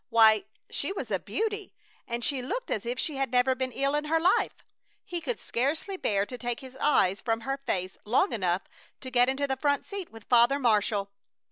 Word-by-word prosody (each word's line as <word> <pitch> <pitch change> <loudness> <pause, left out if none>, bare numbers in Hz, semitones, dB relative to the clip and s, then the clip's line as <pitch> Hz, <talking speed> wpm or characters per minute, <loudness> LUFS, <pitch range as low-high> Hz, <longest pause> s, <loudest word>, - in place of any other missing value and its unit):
Why, 220 -2 +6 0.3
she - - -2
was 275 - -5
a 190 - +1
beauty, 405 - -3 0.3
and 235 -1 -2
she 275 -3 0
looked - - -4
as 215 - -2
if 245 +1 -2
she 295 0 -2
had 270 -2 0
never 250 +1 +3
been 260 0 -2
ill 275 +3 0
in 295 0 0
her 325 +2 +2
life! 355 +3 +2 0.5
He 345 -1 -4
could 480 +7 -3
scarcely 300 +11 -1
bear 200 - +1
to 250 +3 -8
take 240 +2 -3
his 260 -1 -11
eyes 195 -10 +3
from 225 -1 0
her 270 +4 -2
face 185 0 -2
long 250 - +2
enough 185 -3 0 0.4
to 260 - -7
get 245 0 +4
into 270 +2 0
the 265 -1 -1
front 285 +1 +1
seat 395 -3 -6
with 225 -1 -13
Father 245 +3 +5
Marshall. 210 -5 +1
255 Hz, 210 wpm, -28 LUFS, 225-290 Hz, 0.5 s, Why